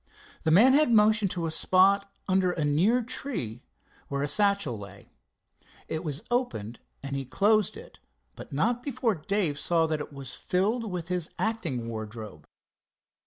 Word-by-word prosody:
The 160 Hz, -, 0 dB
man 220 Hz, +11 st, +6 dB
had 295 Hz, -3 st, +4 dB
motioned 215 Hz, -2 st, +4 dB
to 175 Hz, -2 st, -3 dB
a 160 Hz, -, -2 dB
spot 195 Hz, +4 st, +3 dB, 0.2 s
under 185 Hz, -1 st, +2 dB
a 155 Hz, -4 st, -1 dB
near 190 Hz, +13 st, +2 dB
tree 225 Hz, -, -5 dB, 0.5 s
where 140 Hz, 0 st, -2 dB
a -, -, 0 dB
satchel 200 Hz, -, +2 dB
lay. 100 Hz, 0 st, -12 dB, 0.8 s
It 160 Hz, +2 st, -3 dB
was 150 Hz, -3 st, -4 dB
open 125 Hz, -, -2 dB, 0.2 s
and 140 Hz, 0 st, -4 dB
he 135 Hz, -, -2 dB
closed 205 Hz, -, +2 dB
it, -, -, -13 dB, 0.4 s
but -, -, -11 dB
not 230 Hz, -, 0 dB
before 255 Hz, -4 st, -1 dB
Dave 170 Hz, -3 st, -1 dB
saw 165 Hz, 0 st, +2 dB
that 155 Hz, -1 st, -1 dB
it -, -, -8 dB
was 140 Hz, -2 st, -7 dB
filled 215 Hz, +5 st, -1 dB
with 175 Hz, -1 st, -5 dB
his 180 Hz, -3 st, -2 dB
acting 170 Hz, -, -2 dB
wardrobe. 110 Hz, -7 st, -7 dB
180 Hz, 160 wpm, -27 LUFS, 140-215 Hz, 0.8 s, man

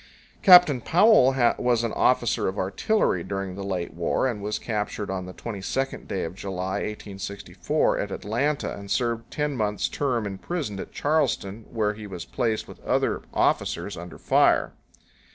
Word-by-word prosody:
Captain 180 Hz, -, +8 dB
Powell 165 Hz, -, +5 dB, 0.2 s
was 120 Hz, -2 st, +2 dB
an 115 Hz, -, -2 dB
officer 120 Hz, -2 st, +2 dB
of 95 Hz, +2 st, -3 dB
artillery 95 Hz, -, +1 dB
during 95 Hz, 0 st, -4 dB
the 100 Hz, +1 st, -6 dB
late 95 Hz, -3 st, -3 dB
war 85 Hz, +9 st, 0 dB
and 115 Hz, -5 st, -3 dB
was 105 Hz, +1 st, -2 dB
captured 105 Hz, -2 st, -3 dB
on 95 Hz, -1 st, -4 dB
the -, -, -7 dB
22d 115 Hz, +6 st, -4 dB
day 95 Hz, -, -2 dB
of 80 Hz, -, -4 dB
July, 95 Hz, -1 st, -3 dB
1864, 100 Hz, -1 st, -2 dB
at -, -, -3 dB
Atlanta 135 Hz, +8 st, -1 dB
and 100 Hz, 0 st, -10 dB
served 115 Hz, +2 st, 0 dB
a -, -, -33 dB
ten 150 Hz, -2 st, -2 dB
months' 105 Hz, -3 st, 0 dB
term 125 Hz, -6 st, -1 dB
in 95 Hz, -1 st, -5 dB
prison 145 Hz, -, -4 dB
at -, -, -7 dB
Charleston, 115 Hz, -9 st, 0 dB
where 105 Hz, -2 st, 0 dB
he 105 Hz, 0 st, -9 dB
was 90 Hz, -4 st, -7 dB
placed 115 Hz, -4 st, -1 dB
with -, -, -13 dB
other -, -, 0 dB
officers -, -, 0 dB
under 85 Hz, +1 st, -9 dB
fire. -, -, +3 dB
105 Hz, 165 wpm, -25 LUFS, 95-125 Hz, 0.2 s, Captain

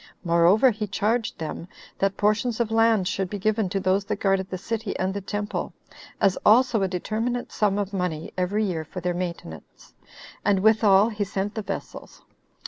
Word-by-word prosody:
Moreover, 175 Hz, +8 st, +4 dB
he 210 Hz, -1 st, -4 dB
charged 220 Hz, +3 st, -1 dB
them, 160 Hz, +1 st, -6 dB, 0.3 s
that 195 Hz, 0 st, 0 dB
portions 215 Hz, +3 st, +1 dB
of 230 Hz, -2 st, 0 dB
land 225 Hz, -4 st, +3 dB
should 190 Hz, -1 st, -2 dB
be 205 Hz, -, -4 dB
given 215 Hz, 0 st, 0 dB
to 195 Hz, -, -1 dB
those 190 Hz, +1 st, +1 dB
that 210 Hz, -, -2 dB
guarded 195 Hz, -1 st, 0 dB
the 185 Hz, -, -4 dB
city 220 Hz, +2 st, -4 dB
and 185 Hz, +1 st, -1 dB
the 200 Hz, -, -4 dB
temple, 205 Hz, +2 st, -4 dB, 0.5 s
as 195 Hz, -2 st, +2 dB
also 230 Hz, 0 st, +4 dB
a 195 Hz, -, +2 dB
determinate 220 Hz, +7 st, -3 dB
sum 205 Hz, -2 st, +1 dB
of 205 Hz, -1 st, -3 dB
money 180 Hz, -5 st, -3 dB
every 190 Hz, +4 st, 0 dB
year 170 Hz, -5 st, -2 dB
for 170 Hz, +4 st, -8 dB
their 180 Hz, 0 st, -1 dB
maintenance; 170 Hz, -, -7 dB, 0.5 s
and 195 Hz, -2 st, +2 dB
withal 215 Hz, -1 st, +5 dB
he 210 Hz, -2 st, -2 dB
sent 200 Hz, +1 st, -3 dB
the 220 Hz, -, -3 dB
vessels. 210 Hz, -, -7 dB
200 Hz, 180 wpm, -25 LUFS, 185-215 Hz, 0.5 s, withal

